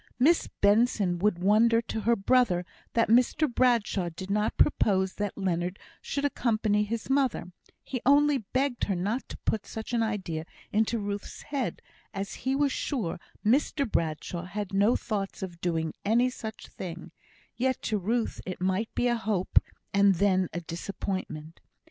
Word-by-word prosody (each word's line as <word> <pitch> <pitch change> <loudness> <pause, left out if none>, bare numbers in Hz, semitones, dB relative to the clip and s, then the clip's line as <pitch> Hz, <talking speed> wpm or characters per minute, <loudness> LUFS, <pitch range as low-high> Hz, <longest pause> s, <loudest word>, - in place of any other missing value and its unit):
Miss 310 +8 +4
Benson 200 -4 +3
would 205 -1 +2
wonder 215 +5 +4
to 230 -1 -4
her 235 +3 +3
brother 195 -4 +2 0.3
that 230 - +3
Mr 250 +7 +4
Bradshaw 235 -8 +2
did 185 +4 -7
not 210 +1 0
propose 190 -9 +3
that 205 -1 -3
Leonard 180 -1 -1 0.2
should 280 0 -2
accompany 215 -6 +1
his 220 +1 -4
mother; 265 -9 +1 0.3
he 255 -3 -4
only 285 +1 +5
begged 255 +4 -1
her 195 - -1
not 210 +8 -2
to - - -7
put 215 -2 -1
such 220 +2 -6
an 235 - +2
idea 190 -8 -2 0.3
into 220 +2 +2
Ruth's 205 -1 -5
head, 280 -4 -3 0.3
as 195 0 -3
he 265 +1 -1
was 285 0 +2
sure 225 - -2 0.3
Mr 275 +4 +2
Bradshaw 170 -1 -2
had 200 +1 -5
no 200 +4 +4
thoughts 200 -3 -3
of 175 -3 -7
doing 160 -2 -1
any 240 +4 +3
such 220 -3 -7
thing, 175 -2 -7 0.4
yet 260 +1 0
to 215 -1 0
Ruth 225 +5 -1
it 185 - -6
might 190 +4 0
be - - +1
a 240 - +3
hope, 215 -5 +2 0.3
and 200 -1 +5
then 185 -1 +2
a 175 - -4
disappointment. 165 -2 -5
210 Hz, 160 wpm, -28 LUFS, 185-240 Hz, 0.4 s, only